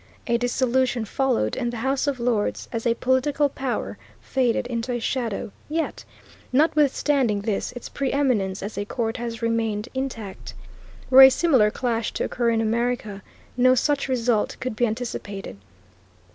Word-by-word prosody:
A 235 - +1
dissolution 245 -1 +1
followed 245 - 0
and 240 - -2
the 240 - -6
House 265 +4 0
of 275 -3 -1
Lords, 235 -3 -1
as 230 0 -2
a 230 - +2
political 270 +4 +1
power, 265 -2 -4 0.2
faded 250 -3 0
into 240 0 -3
a 240 - -1
shadow; 230 -4 -2 0.2
yet, 320 +1 -2 0.5
notwithstanding 280 -5 +2
this, 205 -1 -2
its 245 - -7
preeminence 255 -10 0
as 205 +1 -5
a 205 - -2
court 225 +1 -2
has 235 -1 -5
remained 225 -1 -1
intact. 245 -7 -5 0.6
Were 265 +1 +10
a 265 - +12
similar 260 -7 +3
clash 230 -1 -2
to - - -2
occur 240 -1 0
in 225 -1 +1
America 225 -2 -1 0.3
no 255 +1 +5
such 285 +2 +1
result 240 -4 0
could 255 -3 -4
be 240 +2 +2
anticipated. 215 - -5
240 Hz, 150 wpm, -24 LUFS, 225-260 Hz, 0.6 s, a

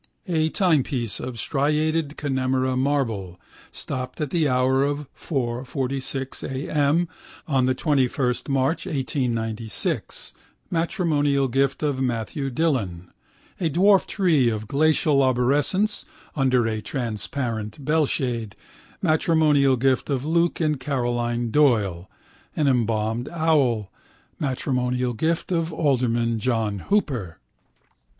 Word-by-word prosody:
A 160 -3 +1
timepiece 140 - +1
of 125 -3 -5
striated 150 +2 0
Connemara 130 -2 0
marble, 115 -10 -1 0.3
stopped 130 -2 -5
at 150 -3 -2
the 165 -4 +2
hour 130 +1 +2
of 145 +1 -1
4.46 135 0 -3
a.m. 145 +5 +1 0.4
on 135 -4 +2
the 130 0 +1
21 130 -3 +1 0.2
March 135 +7 0
1896, 120 - -2 0.4
matrimonial 155 -6 +1
gift 135 +3 0
of 140 -3 0
Matthew 125 +3 -2
Dillon: 120 - -1 0.5
a 170 - +1
dwarf 190 +5 +4
tree 160 - +2
of 110 -1 -4
glacial 150 0 +3
arborescence 140 - +2 0.3
under 130 -4 +2
a 110 -1 -2
transparent 115 0 -4
bellshade, 130 - 0 0.5
matrimonial 155 -5 +3
gift 130 +2 +1
of 135 -1 -1
Luke 170 +2 +1
and 155 -4 +1
Caroline 120 -3 -1
Doyle: 105 - +2 0.5
an 150 - +1
embalmed 115 -1 0
owl, 140 - +1 0.5
matrimonial 125 -2 -1
gift 160 - -1
of 165 -1 0
Alderman 120 -7 +1
John 110 -3 0
Hooper. 125 - -1
135 Hz, 105 wpm, -24 LUFS, 120-150 Hz, 0.5 s, dwarf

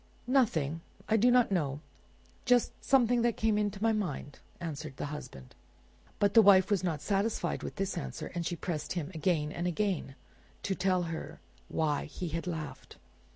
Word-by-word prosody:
"Nothing; 165 - +1 0.3
I 220 - +3
do 230 +3 +5
not 245 -3 +4
know; 145 -7 0 0.6
just 245 -1 +3
something 245 -3 +4
that 235 -1 +1
came 220 -1 +2
into 205 -1 -1
my 225 - +4
mind," 160 -9 -3 0.2
answered 155 -4 -6
the - - -3
husband. 65 - -9 0.6
But 200 -1 +2
the 225 - +9
wife 195 -1 +6
was 195 -3 +2
not 160 -5 -1
satisfied 200 +6 0
with - - -6
this 195 0 -2
answer, - - -6
and 175 -1 -2
she 175 - -2
pressed 165 -2 -3
him 175 -2 -3
again 160 -2 0
and 175 +2 -2
again 180 -7 -1 0.5
to 195 - 0
tell 185 -1 +1
her 165 -1 -6 0.3
why 150 -3 0
he 170 +3 -5
had 165 +3 -4
laughed. 160 -4 -6
180 Hz, 170 wpm, -31 LUFS, 155-210 Hz, 0.6 s, the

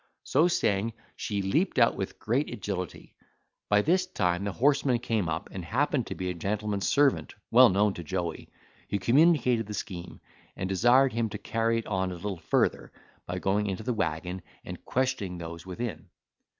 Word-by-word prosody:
So 155 +6 +3
saying 110 - +1 0.2
she 100 -2 -2
leaped 155 - +1
out 115 -2 +5
with 95 - -4
great 125 +7 -1
agility. 95 -6 -5 0.6
By 105 0 +4
this 185 +3 +2
time 90 - 0
the 100 - -1
horseman 135 +2 +2
came 115 -7 -1
up 75 - -3
and 95 - -6
happened 130 - 0
to - - -5
be 90 - -4
a - - -3
gentleman's 100 +3 -2
servant 140 -1 +2 0.2
well 125 +1 +8
known 100 +1 +2
to 85 - -7
Joey, 85 -1 -4 0.4
who - - 0
communicated 125 - +3
the 105 - -5
scheme, 90 -7 -6 0.4
and 95 - -3
desired 120 +7 +4
him 115 -1 0
to 105 - -5
carry 115 +2 0
it 115 - -3
on 95 -2 -1
a - - -5
little 95 0 -5
further, - - 0 0.4
by 90 - -3
going 100 +3 0
into 95 +2 -3
the 125 - -1
waggon, 90 -2 -2 0.2
and - - -8
questioning 110 -8 -1
those 85 +1 -8
within. 95 -3 -5
105 Hz, 175 wpm, -28 LUFS, 95-120 Hz, 0.6 s, well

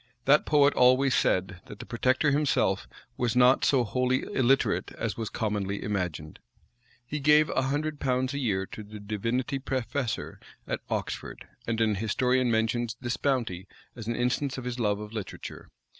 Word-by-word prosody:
That 145 +2 +4
poet 145 -1 +5
always 130 +1 +4
said, 90 -1 +1
that - - -9
the - - -9
protector 130 +5 +1
himself 145 0 +1 0.3
was 120 -1 0
not 125 +1 +5
so 130 -3 +3
wholly 125 +3 0
illiterate 135 +1 +1
as - - -3
was 115 -2 -4
commonly 100 -2 -2
imagined. 90 -7 -3 0.7
He 150 +5 -4
gave 150 +2 +5
a - - +1
hundred 145 +3 -2
pounds 130 0 0
a 140 - -2
year 100 -7 0
to 110 - -9
the 105 0 -10
divinity 115 +6 -2
professor 130 -1 -3 0.3
at - - -3
Oxford; - - -4 0.2
and 115 0 -1
an 110 -2 +3
historian 125 +5 +1
mentions 115 +1 0
this 120 -1 -3
bounty 115 -10 -1 0.3
as 115 -2 -8
an 120 - -1
instance 125 +2 -1
of 130 - -5
his 125 0 -4
love 105 -3 +1
of 105 +1 -8
literature. 105 -4 -7
125 Hz, 165 wpm, -28 LUFS, 105-135 Hz, 0.7 s, poet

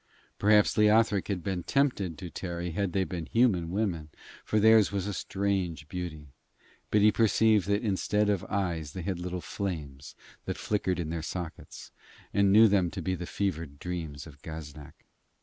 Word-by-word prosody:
Perhaps 105 0 +4
Leothric 105 -2 +4
had 95 -4 -3
been 95 -1 -2
tempted 100 - 0
to 85 +2 -8
tarry 85 -1 -4
had 100 +2 -1
they 95 +1 +1
been 90 -3 -5
human 105 -9 +2
women, 90 -6 -2 0.3
for 110 - +1
theirs 110 -1 +6
was 100 -2 -2
a 105 - -3
strange 95 -5 -2
beauty, 80 -5 -6 0.6
but 105 - +3
he 105 +1 +6
perceived 110 -2 +3
that 100 +2 +1
instead 105 0 +1
of 100 -4 +1
eyes 85 -7 -2
they 90 - -5
had 95 -2 -3
little 90 0 -4
flames 75 -11 -5 0.3
that - - -3
flickered 95 -4 -1
in 80 -2 -3
their 85 -1 -3
sockets, 85 +1 -7 0.4
and 100 -1 +4
knew 110 +3 +8
them 95 -4 +2
to 95 +1 -6
be 95 - -1
the 90 -1 -5
fevered 85 -7 -3
dreams 80 -4 -5
of 70 -4 -14
Gaznak. 75 -2 -10
95 Hz, 170 wpm, -29 LUFS, 85-100 Hz, 0.6 s, knew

